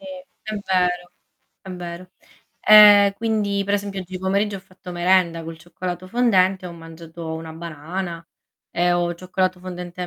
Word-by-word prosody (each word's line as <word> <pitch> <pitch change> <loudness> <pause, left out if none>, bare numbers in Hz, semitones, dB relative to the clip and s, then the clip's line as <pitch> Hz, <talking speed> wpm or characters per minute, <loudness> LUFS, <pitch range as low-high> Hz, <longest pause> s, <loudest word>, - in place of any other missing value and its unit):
Sì, - - -15 0.4
è 215 0 -5
vero, 180 -1 0 0.5
è 190 - -11
vero. 180 0 -8 0.5
E 205 -1 +8
quindi, 210 -3 -1
per 200 - 0
esempio, 200 -1 -3
oggi 185 0 -7
pomeriggio 200 +2 0
ho 190 - -10
fatto 185 -1 -12
merenda 175 -1 +2
col 165 0 -8
cioccolato 175 +2 -6
fondente, 190 -5 +2
ho 175 - -8
mangiato 165 0 -9
una 160 0 -7
banana 165 +2 -6 0.4
e 175 0 +1
ho 175 0 0
cioccolato 185 +1 -2
fondente 180 -1 -7
e - - -3
180 Hz, 155 wpm, -22 LUFS, 170-195 Hz, 0.5 s, E